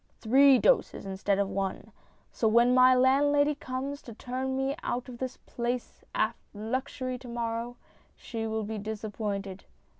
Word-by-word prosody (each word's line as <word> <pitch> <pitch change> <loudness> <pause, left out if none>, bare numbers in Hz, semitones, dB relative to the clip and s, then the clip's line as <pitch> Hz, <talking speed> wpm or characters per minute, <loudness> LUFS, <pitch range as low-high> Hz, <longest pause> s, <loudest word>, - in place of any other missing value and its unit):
1 220 - -6
Three 275 0 +8
doses - - +2
instead 195 +1 0
of 200 -1 +1
one. 195 0 -3 0.4
So 225 - 0
when 235 +3 +5
my 255 0 +7
landlady 285 +3 +4
comes 275 +1 -5
to 230 - -11
turn 260 +2 -3
me 270 +1 0
out 245 +2 -3
of 245 -2 -9
this 260 -1 -4
palace 245 0 -4
of 220 +2 +2 0.2
luxury 255 +3 -3
to 255 - -11
morrow, 235 0 -3 0.4
she'll 220 -2 -4
be 215 +1 -4
disappointed. 205 -2 -4
240 Hz, 150 wpm, -29 LUFS, 220-260 Hz, 0.4 s, Three